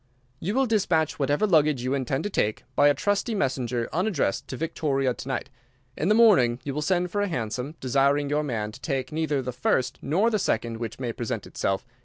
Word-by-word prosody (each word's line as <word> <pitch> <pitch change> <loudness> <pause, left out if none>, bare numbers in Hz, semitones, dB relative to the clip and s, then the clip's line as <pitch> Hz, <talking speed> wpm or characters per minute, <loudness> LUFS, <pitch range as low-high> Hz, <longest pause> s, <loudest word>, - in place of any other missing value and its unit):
You 200 +7 -2
will 270 0 +3
dispatch 175 - +1
whatever 145 +7 +2
luggage 155 - +3
you 130 +1 0
intend 135 +1 -1
to 205 - -2
take 105 - 0
by 145 - +5
a 145 - +4
trusty 205 +3 0
messenger 125 - -1
unaddressed 180 - 0
to 130 - -6
Victoria 135 -4 0
to 125 - -9
night. 135 +1 -3 0.4
In 160 - -1
the 210 - +5
morning 175 - +5
you 140 - -3
will 150 - -2
send 180 +2 0
for 205 - 0
a 205 - +1
hansom, 125 - -3
desiring 140 +2 +2
your 145 +1 +1
man 115 -7 -3
to 125 - -13
take 130 -2 -2
neither 150 -3 -1
the 125 - -3
first 130 +1 0
nor 195 +11 +2
the 215 - +1
second 115 - -1
which 115 +1 -6
may 120 -3 -3
present 120 -1 -4
itself. 95 +4 -2
140 Hz, 210 wpm, -26 LUFS, 125-175 Hz, 0.4 s, by